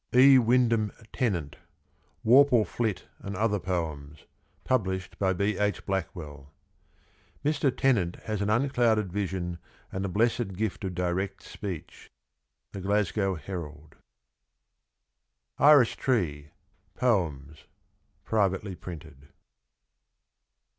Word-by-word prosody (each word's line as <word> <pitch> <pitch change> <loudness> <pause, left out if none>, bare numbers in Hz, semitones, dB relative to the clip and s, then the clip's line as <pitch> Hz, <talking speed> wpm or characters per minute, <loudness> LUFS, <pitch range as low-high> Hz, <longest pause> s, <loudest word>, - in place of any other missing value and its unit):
99 130 +2 +8
E. 130 - +8
Wyndham 115 -3 +2 0.2
Tennant. 90 - -1 0.7
WORPLE 125 -1 +6
FLIT 110 -5 -2
AND 100 0 -6
OTHER 105 0 +1
POEMS. 80 -6 -4 0.4
Published 95 -7 -1
by 95 -1 +2
B. 100 +2 0
H. 105 0 -1
Blackwell. 80 -7 -5 1.0
Mr. 145 -2 +2
Tennant 120 -9 +1
has 110 -2 -3
an 100 - 0
unclouded 115 -5 +2
vision 90 -3 -3 0.3
and 95 - -3
a - - -1
blessed 110 +1 0
gift 105 +1 -3
of 95 -2 -3
direct 90 +2 -2
speech. 95 -6 -8 0.3
— - - -56
The 95 - -6
Glasgow 100 0 0
Herald. 75 -3 -8 1.6
Iris 145 -5 +7
Tree. 80 - -1 0.5
POEMS. 80 - -1 0.6
Privately 100 -2 0
printed. 80 -5 -10
95 Hz, 105 wpm, -28 LUFS, 85-115 Hz, 1.6 s, 99